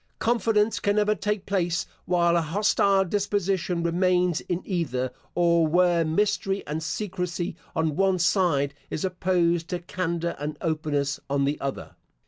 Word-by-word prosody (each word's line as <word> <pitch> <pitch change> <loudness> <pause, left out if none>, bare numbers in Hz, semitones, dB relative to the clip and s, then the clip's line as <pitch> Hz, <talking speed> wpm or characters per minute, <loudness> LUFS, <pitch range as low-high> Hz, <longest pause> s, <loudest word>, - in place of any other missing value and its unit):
Confidence 225 -2 +1
can 205 0 +1
never 210 0 +3
take 210 -1 -2
place 180 -3 0 0.2
while 170 -1 +2
an 170 - +3
hostile 195 +3 +2
disposition 195 -3 -1
remains 180 0 +2
in 175 0 -3
either, 130 - -1 0.2
or 170 -2 +3
where 175 +1 +3
mystery 195 +3 0
and 150 +2 -3
secrecy 180 -1 -3 0.2
on 160 -2 0
one 190 +1 +2
side 170 -6 +2 0.2
is 155 - -2
opposed 175 -2 +1
to 180 - -2
candour 170 -1 -3
and 150 +1 -4
openness 150 -3 -1
on 140 0 +1
the 145 +2 -2
other. 135 -1 -5
175 Hz, 140 wpm, -26 LUFS, 160-195 Hz, 0.2 s, never